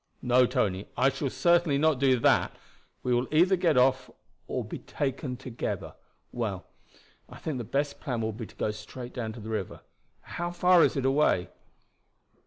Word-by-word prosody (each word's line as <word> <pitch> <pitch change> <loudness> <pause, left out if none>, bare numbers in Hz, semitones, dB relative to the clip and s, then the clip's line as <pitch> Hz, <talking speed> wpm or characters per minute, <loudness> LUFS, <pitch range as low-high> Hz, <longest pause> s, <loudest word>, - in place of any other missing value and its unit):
"No, 125 0 +4
Tony, 95 -3 -1
I 130 +2 +4
shall 135 0 -3
certainly 165 +2 +3
not 155 -2 +2
do 130 -2 +4
that. - - +3 0.5
We 125 - +1
will 120 +1 +1
either 175 +5 +4
get 170 -6 +2
off 130 +1 +3 0.4
or - - -3
be - - -7
taken 135 -2 -3
together. 125 -3 -5 0.4
Well, 105 -6 -3 0.6
I - - -11
think 150 -5 -4
the - - -3
best 140 +6 -2
plan 125 -6 -3
will 110 0 -2
be 110 0 -7
to - - -18
go 105 - -1
straight 120 +4 -9
down 115 -3 -4
to 115 - -10
the 110 +1 -8
river. 110 -4 -4 0.4
How 175 0 -4
far 175 0 +5
is - - +2
it 135 - -1
away?" 135 -10 +2
130 Hz, 180 wpm, -28 LUFS, 115-150 Hz, 0.6 s, far